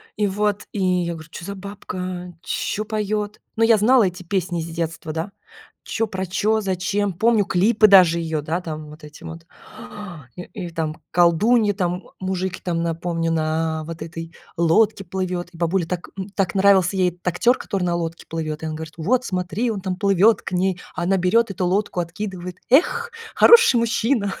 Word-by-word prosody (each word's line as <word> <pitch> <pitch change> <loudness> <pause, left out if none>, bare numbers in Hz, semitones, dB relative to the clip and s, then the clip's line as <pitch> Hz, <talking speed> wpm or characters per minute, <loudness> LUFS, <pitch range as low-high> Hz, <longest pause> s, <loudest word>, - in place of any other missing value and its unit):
и 210 0 +1
вот 205 +1 -1
и 205 - -3
я 180 -2 +1
говорю: 160 0 -10
"Чё 170 - -8
за 200 - -5
бабка? 185 -2 -6
Чё 215 +1 -2
поёт?" 210 -1 -2 0.2
Но 225 - +2
я 225 -1 +6
знала 240 +4 +5
эти 180 -1 -2
песни 180 -1 -2
из 160 - -5
детства, 165 -1 -4
да- 165 +5 -4 0.5
чё 225 - -1
про 190 -2 -4
чё, 215 +4 +1
зачем. 195 +1 -1
Помню 220 +3 +3
клипы 215 +4 +4
даже 180 -4 +6
её 160 -2 -2
да 165 +4 -2
там 155 -2 -6
вот 150 +1 -13
эти 150 +2 -12
вот 165 0 -9 0.9
и, 180 - -7
и 185 -4 -7
там 160 -2 -3
колдуньи 205 +6 +4
там, 180 -1 -2 0.2
мужики, 185 0 -3
там 170 -2 -1
напомню 165 0 -1
на 160 0 -1
вот 165 -1 -8
этой 165 +1 -8 0.2
лодке 195 +5 +3
плывет, 180 -1 -3
и 170 - -14
бабуле 170 +1 0
так, 180 -1 -4
м, 190 +1 -5
так 190 -3 0
нравился 195 -1 +4
ей 185 -1 +3
этот 175 +1 -14
актер, 210 +8 +3
который 195 -2 -3
на 175 - 0
лодке 165 -1 -4
плывет. 155 -1 -4
И - - -2
она 155 - -4
говорит: 160 0 -7
"Вот 245 +10 +1
смотри 190 +6 -1
он 205 -3 -4
там 185 -1 -2
плывёт 200 +2 +3
к - - -6
ней". 185 0 0 0.2
А 175 - -2
она 190 +2 +2
берет 200 +5 +2
эту 185 -1 -2
лодку, 185 0 0
откидывает. 180 +1 -6
"Эх, 470 - +3 0.2
хороший 470 - +7
мужчина". 230 -2 +1
185 Hz, 185 wpm, -22 LUFS, 170-205 Hz, 0.9 s, хороший